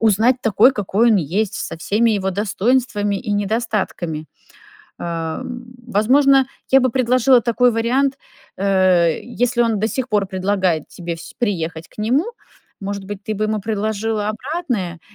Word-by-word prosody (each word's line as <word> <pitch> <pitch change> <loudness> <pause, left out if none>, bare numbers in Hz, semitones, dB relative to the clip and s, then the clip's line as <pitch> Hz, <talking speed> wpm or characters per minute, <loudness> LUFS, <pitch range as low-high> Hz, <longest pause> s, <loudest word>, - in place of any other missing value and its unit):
узнать 225 +3 +3
такой, 225 +4 +5
какой 215 +2 +2
он 215 - +5
есть, 190 +5 -1
со - - -5
всеми 220 +7 +1
его 190 -2 0
достоинствами 205 +1 0
и 210 +1 -5
недостатками. 200 -7 -2 0.7
Э, 165 -1 -3
м, 245 -1 -8
возможно, 265 +5 +4 0.2
я 270 0 +6
бы 255 - +2
предложила 255 +1 +4
такой 245 +1 +2
вариант, 260 +5 +1 0.4
э, 185 -4 +3
если 245 0 0
он 225 -2 +1
до 220 - +1
сих 260 +1 -3
пор 205 -3 +1
предлагает 185 -4 -1
тебе 170 -1 -6
сь 165 - -11
приехать 165 -7 -2
к - - -25
нему, 250 - +1 0.6
может 200 0 -4
быть, 205 0 -7
ты 215 - -2
бы 215 +1 -1
ему 215 0 0
предложила 215 0 -2
обратное 225 - -3
215 Hz, 150 wpm, -19 LUFS, 190-245 Hz, 0.7 s, я